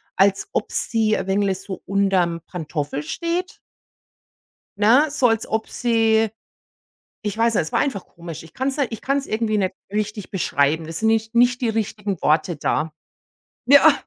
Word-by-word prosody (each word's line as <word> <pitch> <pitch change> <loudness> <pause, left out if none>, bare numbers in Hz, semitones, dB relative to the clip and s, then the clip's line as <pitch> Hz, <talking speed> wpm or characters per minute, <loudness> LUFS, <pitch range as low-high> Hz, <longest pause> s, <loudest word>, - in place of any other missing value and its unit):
als 195 - +2
ob - - -1
sie 220 -2 +1
ein 190 - -3
wenig 195 -1 +1
so 195 -1 -7
unter 195 -1 +2
dem 170 -1 -5
Pantoffel 150 -4 -4
steht. 340 - -3 1.2
Ne, 240 +9 +5
so 275 -4 +3
als 225 -1 0
ob 220 0 -1
sie 225 -2 +2 0.9
ich 210 -1 -3
weiß 230 0 +2
nicht, - - +3
es 160 - -8
war - - +2
einfach 220 -10 -2
komisch. 165 -2 -9
Ich 165 0 -16
kann 260 +1 -1
es 270 - -2
nicht 275 -5 0
ich 225 - -6
kann 275 +1 +1
es 280 - -5
irgendwie 215 -1 0
nicht 190 -2 0 0.2
richtig 210 -1 -3
beschreiben. 160 -3 +1
Das 165 0 -5
sind 220 - +2
nicht 225 +1 +1
nicht 245 +1 +4
die 245 - 0
richtigen 210 -3 -2
Worte 160 +3 +2
da. 155 +1 -1 0.8
Ja, 285 +3 +8
210 Hz, 180 wpm, -22 LUFS, 185-230 Hz, 1.2 s, Ja